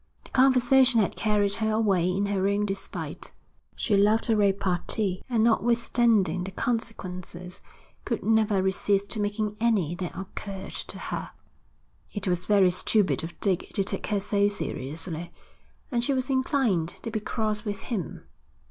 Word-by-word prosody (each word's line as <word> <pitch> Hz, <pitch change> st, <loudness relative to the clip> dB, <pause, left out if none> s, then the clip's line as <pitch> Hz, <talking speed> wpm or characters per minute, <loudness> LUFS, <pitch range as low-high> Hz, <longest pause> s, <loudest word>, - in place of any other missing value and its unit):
The -, -, -15 dB
conversation 255 Hz, -1 st, +5 dB
had 205 Hz, -, +1 dB
carried 205 Hz, -2 st, +1 dB
her 220 Hz, -1 st, 0 dB
away 195 Hz, -5 st, +2 dB
in 195 Hz, +2 st, 0 dB
her 195 Hz, -1 st, 0 dB
own 200 Hz, +1 st, +1 dB
despite. 195 Hz, -1 st, -5 dB, 0.4 s
She 210 Hz, -, +1 dB
loved 215 Hz, +4 st, +3 dB
a -, -, +4 dB
repartee 195 Hz, -1 st, +1 dB
and 230 Hz, -3 st, +2 dB
notwithstanding 230 Hz, -5 st, +2 dB
the 190 Hz, -, -5 dB
consequences 185 Hz, -6 st, -4 dB, 0.4 s
could -, -, -3 dB
never 215 Hz, -3 st, +2 dB
resist 195 Hz, +2 st, +1 dB
making 205 Hz, 0 st, -2 dB
any 210 Hz, -9 st, +1 dB
that 180 Hz, -1 st, -5 dB
occurred 195 Hz, 0 st, -7 dB
to -, -, -6 dB
her. -, -, -5 dB, 0.8 s
It 205 Hz, -1 st, -4 dB
was 180 Hz, 0 st, -1 dB
very 195 Hz, -3 st, +5 dB
stupid 185 Hz, 0 st, +2 dB
of 165 Hz, +1 st, -8 dB
Dick 190 Hz, -4 st, 0 dB
to 200 Hz, -, +2 dB
take 195 Hz, 0 st, -2 dB
her 205 Hz, -1 st, +1 dB
so 200 Hz, 0 st, +2 dB
seriously, 165 Hz, -2 st, -4 dB, 0.6 s
and 240 Hz, -2 st, +1 dB
she 275 Hz, -, +1 dB
was 260 Hz, +1 st, -1 dB
inclined 260 Hz, -, +1 dB
to 230 Hz, -, -4 dB
be 215 Hz, -, -1 dB
cross 215 Hz, 0 st, -2 dB
with 205 Hz, -3 st, -4 dB
him. 195 Hz, -, -4 dB
205 Hz, 150 wpm, -27 LUFS, 190-225 Hz, 0.8 s, conversation